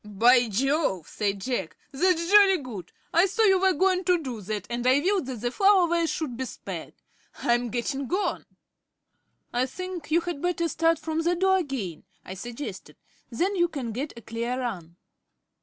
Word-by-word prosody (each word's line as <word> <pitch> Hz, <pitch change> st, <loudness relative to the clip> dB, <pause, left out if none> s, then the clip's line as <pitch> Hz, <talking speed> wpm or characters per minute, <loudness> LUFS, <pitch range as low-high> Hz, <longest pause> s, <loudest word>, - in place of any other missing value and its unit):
"By 235 Hz, +4 st, +4 dB
Jove," 250 Hz, -, 0 dB
said 200 Hz, -1 st, -2 dB
Jack, 215 Hz, -8 st, -3 dB
"that's 340 Hz, +4 st, +1 dB
jolly 400 Hz, -2 st, +7 dB
good. 230 Hz, -, -8 dB, 0.2 s
I 345 Hz, +4 st, +5 dB
saw 445 Hz, +4 st, 0 dB
you 385 Hz, -3 st, +5 dB
were 380 Hz, -1 st, +4 dB
going 370 Hz, +3 st, +2 dB
to 360 Hz, -1 st, +4 dB
do 255 Hz, -9 st, -6 dB
that, 205 Hz, 0 st, -4 dB
and 240 Hz, +1 st, -2 dB
I 260 Hz, +2 st, +5 dB
willed 375 Hz, -2 st, 0 dB
that 250 Hz, -5 st, -6 dB
the 240 Hz, 0 st, -1 dB
flower 390 Hz, +1 st, +4 dB
vase 335 Hz, -1 st, +1 dB
should 295 Hz, -7 st, -3 dB
be 260 Hz, +2 st, -3 dB
spared. -, -, -7 dB, 0.4 s
I'm 240 Hz, 0 st, 0 dB
getting 255 Hz, +3 st, -3 dB
on." 390 Hz, +3 st, -1 dB, 1.1 s
"I 245 Hz, +2 st, +1 dB
think 365 Hz, +1 st, -7 dB
you 335 Hz, +2 st, +3 dB
had 340 Hz, -4 st, -5 dB
better 350 Hz, -1 st, 0 dB
start 330 Hz, +1 st, +2 dB
from 320 Hz, +1 st, -2 dB
the 345 Hz, +2 st, +1 dB
door 380 Hz, +2 st, +3 dB
again," 245 Hz, -, -4 dB, 0.2 s
I 185 Hz, -, -7 dB
suggested. 240 Hz, +8 st, -7 dB, 0.3 s
"Then 360 Hz, -, -1 dB
you 345 Hz, -2 st, +3 dB
can 270 Hz, -8 st, -5 dB
get 265 Hz, +7 st, -4 dB
a -, -, -9 dB
clear 235 Hz, +2 st, -3 dB
run." 180 Hz, -10 st, -5 dB
280 Hz, 180 wpm, -26 LUFS, 235-350 Hz, 1.1 s, jolly